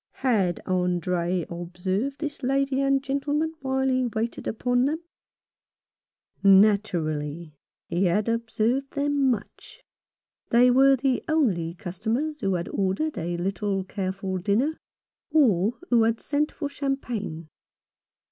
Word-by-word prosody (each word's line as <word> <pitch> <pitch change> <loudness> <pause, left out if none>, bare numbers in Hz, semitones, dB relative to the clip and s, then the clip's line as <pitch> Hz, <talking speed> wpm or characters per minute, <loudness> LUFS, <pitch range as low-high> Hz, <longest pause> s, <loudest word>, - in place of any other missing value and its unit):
Had 195 -9 +2
Andre 180 -1 0
observed 185 +9 -3
this 295 -2 -5
lady 275 +1 +1
and 275 0 +2
gentleman 290 +3 -1
while 265 0 0
he 255 -1 +1
waited 230 0 -3
upon 245 +2 +1
them? 315 +4 -2 1.4
Naturally! 170 -6 +2 0.3
He 180 +3 0
had 200 +5 +1
observed 230 +3 0
them 285 -1 +1
much. 225 -5 -5 0.7
They 245 +2 +5
were 270 +2 +6
the 265 0 0
only 190 - +1
customers 225 - -3
who 195 -6 0
had 170 -1 -3
ordered 200 +11 -1
a 175 +1 -3
little 195 +2 -1
careful 190 -1 -3
dinner, 220 - +1 0.5
or 225 - +3
who 235 -2 +5
had 225 0 +2
sent 300 +1 0
for 290 - -4
cham 280 -1 -2
pagne. 200 - -5
225 Hz, 120 wpm, -25 LUFS, 185-270 Hz, 1.4 s, were